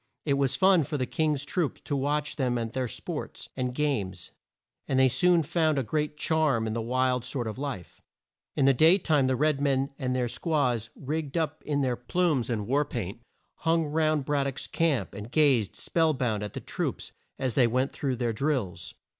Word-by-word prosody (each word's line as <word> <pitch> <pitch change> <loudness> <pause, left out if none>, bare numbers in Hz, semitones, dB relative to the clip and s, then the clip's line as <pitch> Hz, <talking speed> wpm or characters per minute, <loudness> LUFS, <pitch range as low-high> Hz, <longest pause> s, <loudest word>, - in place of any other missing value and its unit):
It 145 - +2
was 140 -2 +1
fun 190 -3 +5
for 150 +2 -3
the 130 - 0
King's 150 0 0
troops 165 -1 -1
to 145 - -3
watch 145 +2 -1
them 125 -5 0
at 115 -1 -3
their 130 -1 -1
sports - - -6
and 125 -1 -1
games, 125 -9 -2 0.6
and 135 - 0
they 130 0 +6
soon 175 +5 +3
found 160 -1 +1
a 135 - +1
great 150 +3 -2
charm 150 -8 +1
in 110 - -2
this 115 - -2
wild 125 +1 +1
sort 125 -1 -2
of 110 +2 -5
life. 135 - -6 0.5
In 135 - +2
the 135 - +6
day 160 +8 +6
time 150 -8 +2
the 130 - +2
red 150 +1 +1
men 135 0 +1
and 130 -2 -1
their 125 -1 0
squaws, 125 -6 0
rigged 150 +2 -3
up 160 -2 -1
in 145 -1 +1
their 130 -2 +1
plumes 145 0 0
and 110 -4 -1
war 140 +6 +2
paint, 115 -6 -5 0.4
hung 165 0 +1
round 155 -1 +1
Brad 140 -1 +1
dock's 135 - -4
camp, 165 -6 0
and 105 +3 -8
gazed 135 -10 +3
spell 160 -2 +1
bound 115 -5 -1
at 105 -1 -5
the - - -5
troops - - -4 0.3
as 130 -3 -1
they 125 0 +4
went 130 +4 0
through 135 -3 -2
their 120 -1 -1
drills. 105 - -2
135 Hz, 200 wpm, -28 LUFS, 125-150 Hz, 0.6 s, they